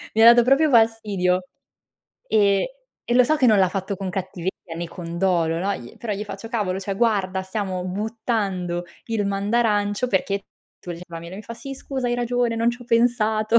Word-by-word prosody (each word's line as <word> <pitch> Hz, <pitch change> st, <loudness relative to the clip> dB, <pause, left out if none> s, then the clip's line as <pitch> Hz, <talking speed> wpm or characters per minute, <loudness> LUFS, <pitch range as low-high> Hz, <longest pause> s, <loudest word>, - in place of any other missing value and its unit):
Mi 220 Hz, -, +4 dB
ha -, -, +9 dB
dato 240 Hz, 0 st, +5 dB
proprio 275 Hz, +5 st, +4 dB
fastidio. 210 Hz, -6 st, +2 dB, 0.8 s
E 205 Hz, -, +2 dB, 0.3 s
e 240 Hz, -, 0 dB
lo 250 Hz, 0 st, +6 dB
so 310 Hz, +6 st, +2 dB
che 270 Hz, -4 st, +3 dB
non 215 Hz, -3 st, +5 dB
l'ha 190 Hz, -1 st, +4 dB
fatto 195 Hz, +1 st, -3 dB
con 190 Hz, 0 st, -4 dB
cattiveria 180 Hz, -2 st, -5 dB
né 170 Hz, +1 st, -3 dB
con 170 Hz, 0 st, -7 dB
dolo, 170 Hz, -3 st, +2 dB
no, 195 Hz, +3 st, 0 dB
gli 120 Hz, -9 st, -10 dB
però 225 Hz, -3 st, -4 dB
gli 205 Hz, +1 st, -3 dB
faccio: 225 Hz, +2 st, -8 dB
"Cavolo, 205 Hz, -5 st, -1 dB
cioè 195 Hz, 0 st, -3 dB
guarda! 195 Hz, -4 st, +1 dB
Stiamo 190 Hz, -1 st, -3 dB
buttando 195 Hz, -3 st, -2 dB, 0.2 s
il 225 Hz, -2 st, -1 dB
mandarancio 205 Hz, +2 st, +1 dB
perché 200 Hz, -1 st, 0 dB, 0.4 s
tu 175 Hz, -, -8 dB
gli" 170 Hz, -, -9 dB
ma 165 Hz, -1 st, -7 dB
lui 170 Hz, +1 st, -9 dB
mi 210 Hz, -, -8 dB
fa: 230 Hz, -, -8 dB
"Sì, 270 Hz, +4 st, -7 dB
scusa 265 Hz, -1 st, -4 dB
hai 240 Hz, -, +1 dB
ragione, 245 Hz, -1 st, 0 dB
non 230 Hz, +1 st, +2 dB
ci 240 Hz, -, -8 dB
ho -, -, -14 dB
pensato." 230 Hz, -2 st, +3 dB
205 Hz, 200 wpm, -23 LUFS, 185-230 Hz, 0.8 s, ha